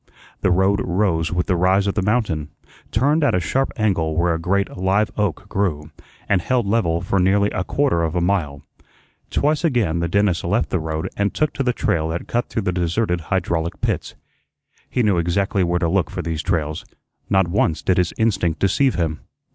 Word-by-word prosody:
The - - +2
road 95 +3 +2
rose 90 -3 0
with 90 -1 0
the 95 - +1
rise 95 +3 +3
of 100 - 0
the 105 - 0
mountain, 95 -8 0 0.4
turned 145 +8 +2
at 145 - +3
a - - +2
sharp 130 - 0
angle 85 -7 0
where 85 0 +2
a 80 - -2
great 100 +4 0
live 95 +3 +1
oak 100 -2 -2
grew, 80 -7 -2 0.4
and 95 -3 +2
held 120 +6 0
level 95 -6 +1
for 95 +2 0
nearly 100 +3 +3
a 95 - -2
quarter 135 -6 +1
of 80 0 -1
a - - +2
mile. 85 -6 -1 0.7
Twice 150 +2 +1
again 115 - +1
the 85 - 0
dentist 100 -1 +1
left 100 +7 0
the 90 - +1
road 80 0 -3
and 100 0 0
took 155 -2 0
to - - -3
the 125 -2 +2
trail 80 -8 0
that 80 +2 -4
cut 120 +1 -1
through 110 - -2
deserted 90 +1 0
hydraulic 85 -2 -2
pits. - - -2 0.7
He 125 - 0
knew 100 -5 +2
exactly 95 +3 0
where 90 0 +1
to 85 -1 0
look 90 +2 +1
for 90 - -5
these 80 -1 -2
trails; 80 -4 -2 0.5
not 95 -2 +3
once 85 -3 0
did 90 -1 +2
his 90 -2 +1
instinct 95 -8 +1
deceive 115 - +2
him. 80 -3 -1
95 Hz, 195 wpm, -21 LUFS, 85-105 Hz, 0.7 s, rise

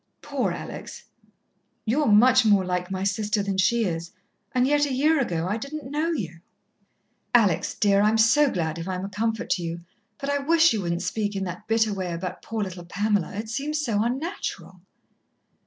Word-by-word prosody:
"Poor - - -1
Alex!" - - -7 0.8
"You're 280 +7 +1
much 245 +4 +6
more 205 -4 +4
like 180 0 -2
my 190 0 -3
sister 205 +1 0
than 195 -1 -2
she 235 +5 +3
is, 170 -2 -3 0.4
and 250 0 +2
yet 290 +1 +3
a - - -4
year 300 +4 +3
ago 170 -9 -1
I 205 +4 -1
didn't 280 +3 -7
know 310 +3 0
you." 175 - -4 1.0
"Alex, 200 -6 +3
dear, 200 -1 +3
I'm 215 +2 +3
so 265 +7 +5
glad 165 -6 -2
if 165 - -5
I'm 185 0 -3
a - - -5
comfort 220 +2 -2
to 180 - +1
you 170 +1 -4 0.4
but 275 - -5
I 285 0 +1
wish 330 +2 +4
you 215 - -1
wouldn't 170 0 -2
speak 205 +2 -2
in 195 - -2
that 185 +3 -6
bitter 225 -1 +2
way 185 -3 -3
about 180 +1 -5
poor 225 -2 -3
little 185 -2 -6
Pamela. 205 0 0
It 215 +2 -4
seems 290 +6 -2
so 230 -8 0
unnatural." 250 - -4
210 Hz, 190 wpm, -25 LUFS, 185-255 Hz, 1.0 s, much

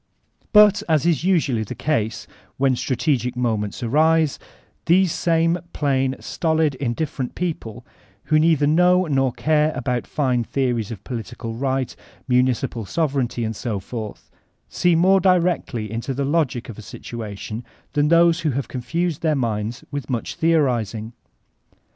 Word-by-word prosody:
But, 210 -1 +6
as 155 -2 +3
is 170 -2 +2
usually 160 -11 +2
the 105 - -7
case 115 -8 -1 0.3
when 135 -1 +2
strategic 125 0 -1
moments 115 -2 -2
arise, 155 +4 +2 0.5
these 185 +1 +4
same 165 +1 +1
plain, 135 -2 0
stolid, 160 -3 0
indifferent 130 +1 -3
people, 125 -10 -4 0.4
who 155 +1 +3
neither 155 -2 +3
know 180 +4 +4
nor 135 -4 +1
care 155 +3 +1
about 125 -1 -2
fine 130 -5 0
theories 120 -4 -1
of 105 -4 -8
political 115 -1 -6
right, 130 +1 -2 0.3
municipal 125 -2 +1
sovereignty, 135 - -1
and 110 0 -3
so 110 -2 -3
forth, 110 +1 -7 0.4
see 175 - +2
more 190 +4 +5
direct* 180 -2 +2
ly 120 -4 -3
failo 115 +5 -4
the 140 +1 -1
logic 140 -5 0
of 115 -2 -9
a - - -7
situation 110 0 -7 0.3
than 145 0 +2
those 170 +1 +5
who 165 -3 0
have 135 0 -2
con* 125 - -5
fused 170 +4 -2
their 155 -2 +2
minds 115 -3 -2
with 145 -1 -5
much 120 -3 -2
theorizing. 120 - 0
135 Hz, 145 wpm, -22 LUFS, 120-160 Hz, 0.5 s, But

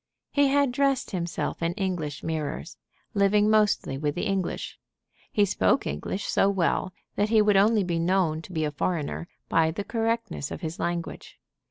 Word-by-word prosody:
He 285 -1 +4
had 280 -1 +3
dressed 275 0 +1
himself 175 -3 -3
in 170 +1 0
English 175 -7 -3
mirrors, 155 - -3 0.4
living 205 +1 +3
mostly 210 -10 +2
with 145 -1 -1
the - - -2
English. 195 -3 -2 0.5
He 205 - +3
spoke 95 - +2
English 75 - -3
so 195 - +3
well 185 -1 0 0.3
that 205 +1 +2
he 220 -1 +5
would 210 -1 +4
only 210 +2 +4
be 170 -2 -1
known 170 -2 +1
to 175 - -12
be 160 -3 -1
a 150 - -2
foreigner 160 +2 -2 0.2
by 160 -1 +3
the 170 +5 -3
correctness 225 - -2
of - - -6
his 160 -1 -5
language. 170 -1 -4
185 Hz, 170 wpm, -26 LUFS, 160-210 Hz, 0.5 s, he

